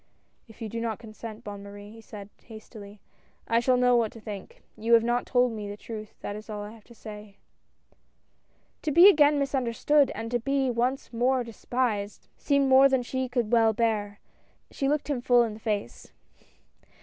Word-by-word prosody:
"If 225 0 -11
you - - -3
do 230 +2 -5
not 225 -3 -2
consent. 220 0 -10
Bonne 205 -1 -7
Marie," 205 +1 -11
he 225 +1 -13
said 205 -2 -10 0.2
hastily, 215 -2 -12 0.3
" - - -37
I 230 - +3
shall 250 +1 +2
know 250 0 +4
what 230 -3 +1
to 230 - -11
think. 205 -3 -9
You 230 +2 +3
have 230 - +4
not 240 +1 0
told 250 -1 +2
me 210 -2 -6
the 205 - -7
truth, 215 -1 -9
that 205 - -5
is 215 +1 -10
all 210 -1 -5
I 205 - -8
have 225 -2 -16
to 235 - -17
say." 210 -2 -11 1.4
To 310 - -2
be 340 +6 +8
again 295 -6 +5
misunderstood, 275 +1 +1
and 230 +1 -5
to 240 - +1
be 270 +1 0
once 245 +2 -2
more 250 +2 +1
despised 230 -3 -3
seemed 280 -1 +1
more 265 +1 +7
than 265 -2 +1
she 260 +1 -3
could 240 -3 -1
well 225 -2 +4
bear 210 -2 -1 0.3
— - - -40
she 275 - -1
looked 300 0 -1
him 280 -4 -2
full 245 0 +4
in 225 -2 -3
the 215 - -11
face. 210 - -4
230 Hz, 195 wpm, -27 LUFS, 215-255 Hz, 1.4 s, be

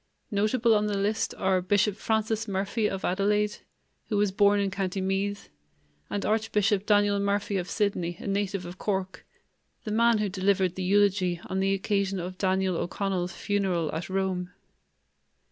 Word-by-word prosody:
Notable 220 +3 +2
on 210 0 +2
the 205 -1 -1
list 205 +2 -1
are 190 -1 +2
Bishop 205 +2 +2
Francis 220 0 -1
Murphy 200 +3 0
of 195 - -4
Adelaide, 210 +2 +1 0.5
who 210 - 0
was 205 -1 +2
born 205 +1 +4
in 200 -1 0
Co. 190 0 -1
Meath, 195 +1 -2 0.6
and 205 - -2
Archbishop 210 -2 +1
Daniel 205 -1 +3
Murphy 200 0 0
of 180 -1 -3
Sydney, 180 -5 -1
a - - -9
native 195 -1 -1
of 175 +1 -9
Cork, 190 -2 -3 0.6
the 215 - -4
man 230 +1 +4
who 210 -1 0
delivered 190 -1 +1
the 190 - -5
eulogy 190 -2 +2
on 190 - -2
the 195 0 +2
occasion 195 -1 -1
of 180 +1 -6
Daniel 190 -2 +1
O'Connell's 180 0 -2
funeral 185 -6 -1
at 165 +3 -4
Rome. 190 -2 -1
200 Hz, 160 wpm, -27 LUFS, 190-210 Hz, 0.6 s, born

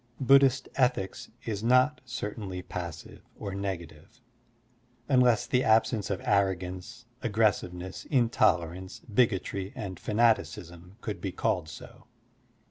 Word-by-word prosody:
Bud 135 +1 +7
dhist 135 -1 +2
ethics 125 -7 0 0.2
is 105 -2 -3
not 125 +5 +4
certainly 105 -6 -5
passive 85 -3 -7 0.2
or 100 -2 -5
negative, 90 -3 -6 0.9
unless 125 -5 +4
the 125 +1 +1
absence 110 -1 +2
of 100 - -1
arrogance, 95 +2 -1 0.2
aggressiveness, 100 -5 -1
intolerance, 95 - +1
bigotry, 100 -4 0
and 95 -4 -6
fanaticism 100 -5 0
could 105 - -5
be 95 - -3
called 90 -3 -1
so. 80 - -12
100 Hz, 110 wpm, -28 LUFS, 90-120 Hz, 0.9 s, Bud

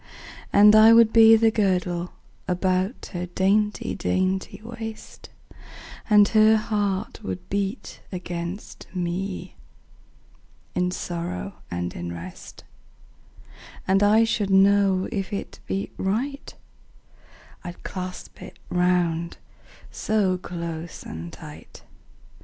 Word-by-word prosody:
And 210 +1 +7
I 220 +1 +8
would 230 -1 +6
be 225 -1 +8
the 225 0 +4
girdle 180 -4 0 0.3
About 185 +4 -1
her 180 0 -3
dainty 200 +4 0
dainty 185 +1 -1
waist, 225 -1 -9 0.8
And 210 -1 +6
her 220 0 +5
heart 205 -2 -2
would 180 -3 -6
beat 200 +1 -3
against 180 +1 -6
me, 180 - -4 1.2
In 180 0 0
sorrow 180 +2 -4 0.2
and 90 0 -3
in 85 0 -6
rest: 85 +1 -10 0.8
10 - - -24 0.4
And 195 +1 +4
I 210 +2 +5
should 215 -3 0
know 195 -1 +4
if 195 0 -3
it 200 - -6
beat 195 +1 -3
right, 255 +9 -2 1.1
I'd 175 0 -9
clasp 185 -1 -7
it - - -11
round 175 -2 +1 0.5
so 205 -4 0
close 170 -2 -6
and 80 +1 -7
tight. - - -12
190 Hz, 105 wpm, -24 LUFS, 180-210 Hz, 1.2 s, I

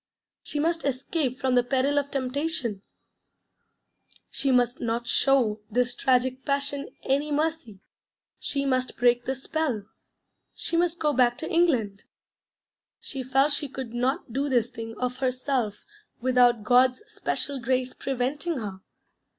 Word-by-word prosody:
She 295 - -4
must 330 +2 0
escape 265 0 -1
from 260 -1 +1
the 250 - +5
peril 270 +3 +1
of 285 0 -4
temptation: 275 - -2 1.5
she 275 - 0
must 245 0 +2
not 235 +1 -2
show 240 -6 +3
this 245 +2 +1
tragic 260 0 +1
passion 280 0 -1
any 285 +3 0
mercy: 295 - -2 0.6
she 280 -1 -2
must 255 -1 0
break 245 0 +3
this 265 0 -3
spell: 285 -11 -1 0.7
she - - -3
must 345 0 +2
go 300 -3 +1
back 245 -2 +3
to 315 - -5
England. 250 - +1 0.9
She 270 - -4
felt 270 +3 +3
she 290 - -1
could 260 -3 -6
not 250 +1 -1
do 280 +2 0
this 240 -2 +2
thing 225 -1 -7
of 250 0 -2
herself 255 -4 -1 0.3
without 245 -3 +4
'God's 250 - +4
special 280 -9 -2
grace 255 +1 0
preventing 275 +5 -2
her'? 200 -5 -5
260 Hz, 135 wpm, -26 LUFS, 245-285 Hz, 1.5 s, the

